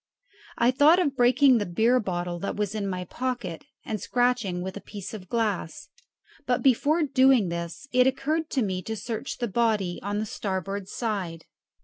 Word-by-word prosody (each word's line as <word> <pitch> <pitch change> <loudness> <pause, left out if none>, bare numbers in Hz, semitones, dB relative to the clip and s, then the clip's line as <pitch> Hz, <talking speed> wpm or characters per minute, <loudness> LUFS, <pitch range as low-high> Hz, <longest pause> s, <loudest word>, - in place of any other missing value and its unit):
I 235 +2 +4
thought 295 +6 +6
of 300 -7 +1
breaking 250 +1 +5
the 205 - -1
beer 225 +8 +3
bottle 175 -4 -3
that 200 - -3
was 210 -1 -2
in 210 -2 -2
my 180 -1 -3
pocket 240 -6 -4 0.2
and 215 -2 -3
scratching 245 -8 0
with 190 0 -5
a 205 - -7
piece 205 -1 -8
of 215 - -6
the 185 - -18
glass; 210 -8 -2 0.6
but 245 -1 +1
before 290 +5 +3
doing 260 - +4
this 170 - -5
it 250 0 +4
occurred 300 +5 -1
to 265 - 0
me 185 -3 -2
to 220 +5 -4
search 225 +3 -5
the 240 - -2
body 210 -5 0
on 205 +1 -3
the 215 - -1
starboard 195 -1 -4
side. 195 -8 -4
220 Hz, 185 wpm, -26 LUFS, 190-255 Hz, 0.6 s, thought